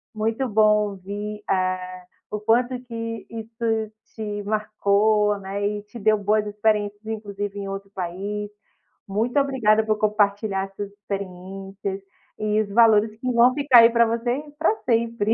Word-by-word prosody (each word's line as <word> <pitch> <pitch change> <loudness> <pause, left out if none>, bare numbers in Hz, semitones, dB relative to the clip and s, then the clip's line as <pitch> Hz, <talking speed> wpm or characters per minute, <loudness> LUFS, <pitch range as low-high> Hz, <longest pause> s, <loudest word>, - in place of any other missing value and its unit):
muito 225 +4 -1
bom 210 -1 +3
ouvir, 205 +2 -6
eh, 185 -1 -1 0.3
o 210 - -2
quanto 240 +4 +2
que 230 -2 -6
isso 225 -1 -3 0.2
te 210 -2 -4
marcou, 210 0 +2
né, 200 +1 -2
e 205 0 -3
te 210 +3 -11
deu 215 +1 +3
boas 210 +1 +1
experiências 210 0 0
inclusive 205 -2 -5
em 200 - -5
outro 195 0 -6
país. 200 +3 -4 0.6
Muito 225 +7 +1
obrigada 235 -6 +3
por 215 -1 +1
compartilhar 205 -2 +1
essas 195 +1 -7
experiências 195 0 -6 0.4
e 215 0 0
os 205 - -4
valores 220 0 +4
que 255 +1 -2
vão 240 +2 +5
ficar, 280 -4 +6
aí, 230 0 +8
pra 235 0 +4
você 240 +5 -1 0.2
pra 375 +7 +3
sempre. 230 -2 +1
210 Hz, 145 wpm, -23 LUFS, 200-225 Hz, 0.6 s, aí